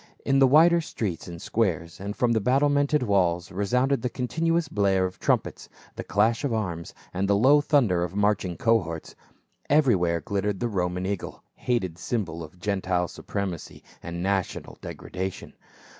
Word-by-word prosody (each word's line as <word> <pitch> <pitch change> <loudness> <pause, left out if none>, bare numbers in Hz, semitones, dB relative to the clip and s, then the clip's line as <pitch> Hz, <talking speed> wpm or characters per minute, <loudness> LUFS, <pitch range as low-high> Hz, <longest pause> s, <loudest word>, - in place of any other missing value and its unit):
In 135 0 +3
the 135 - +7
wider 165 +5 +6
streets 105 - -4
and 85 -1 -8
squares 85 -7 -1
and 100 +2 -5
from 120 -1 +1
the 110 -2 +2
battlemented 145 +4 +2
walls 90 -5 +1
resounded 125 +8 +1
the 125 - -1
continuous 160 +7 0
blare 100 -6 +2
of 90 0 -6
trumpets, - - -1 0.3
the - - -5
clash 110 +5 +1
of 140 - 0
arms, 90 -7 -3 0.2
and 95 +2 -1
the 100 - +4
low 135 +8 +5
thunder 125 - +2
of 90 +2 -4
marching 100 -4 +1
cohorts. 85 -9 0 0.6
Every 145 -6 +5
where 85 -2 +1
glittered 100 +4 -2
the 120 - -1
Roman 90 -2 -1
eagle, 100 -1 -4
hated 95 -9 -2
symbol 90 -5 -3
of 80 +3 -12
Gentile 90 -3 -1
supremacy 95 -5 -5 0.2
and 85 +1 -5
national 95 -1 -2
degradation. 95 +1 -6
100 Hz, 160 wpm, -26 LUFS, 90-125 Hz, 0.6 s, the